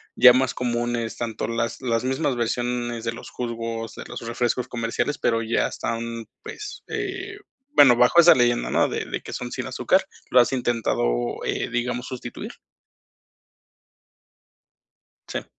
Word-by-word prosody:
ya 125 0 +9
más 130 0 +2
comunes, 120 -1 -2
tanto 115 -2 -3
las 115 +2 -2
las 115 -2 0
mismas 135 0 0
versiones 120 0 -1
de 115 - -1
los 115 - -10
jugos, 115 -1 -4
de - - -7
los - - -7
refrescos 120 +1 -1
comerciales, 120 +4 -2
pero 115 -1 +1
ya 115 +1 +1
están, 115 0 -4 0.2
pues, 420 0 -8
eh, 400 -1 -4 0.4
bueno, 125 -4 +8
bajo 125 +8 +5
esa 170 +1 +8
leyenda, 120 -1 +2
¿no? - - +3
De - - -3
de - - -4
que - - -8
son 125 -1 -5
sin 130 0 -4
azúcar 185 +8 +2 0.3
¿lo 125 - +6
has 120 - +4
intentado - - 0
eh, - - -1
digamos, 125 +1 -2
sustituir? 125 -1 -7 2.7
Sí. - - -4
120 Hz, 145 wpm, -24 LUFS, 115-130 Hz, 2.7 s, ya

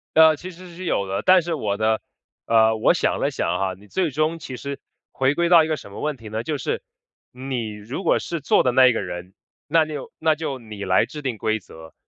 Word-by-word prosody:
呃， 160 -1 +7
其 185 +5 -8
实 180 +1 -12
是 185 +1 -7
有 100 - 0
的， 95 - -2
但 185 0 +6
是 170 0 -3
我 105 -9 -2
的， 110 0 +1 0.4
呃， 110 -1 +4
我 110 - +3
想 - - 0
了 - - +1
想 - - -2
啊， 95 +1 0
你 105 +2 -18
最 180 - 0
终 155 +4 0
其 130 -5 -7
实 140 +1 -6 0.3
回 135 +2 +1
归 170 0 +1
到 170 -2 +8
一 - - -2
个 155 -1 -1
什 100 - -12
么 100 - -8
问 150 -2 -2
题 115 -3 -10
呢， 110 +2 -3
就 150 +2 -2
是 - - -2 0.5
你 125 -4 -4
如 110 - -6
果 - - +3
是 170 -2 -4
做 - - +3
的 125 - +2
那 130 +1 +6
一 125 - +4
个 - - -1
人， 90 +1 -7 0.3
那就 155 -2 0
那 160 -1 +2
就 145 -4 -4
你 105 -4 -9
来 95 0 +3
制 150 - -8
定 125 -5 -3
规 110 +2 0
则， 80 -3 -14
130 Hz, 265 characters per minute, -23 LUFS, 110-155 Hz, 0.5 s, 到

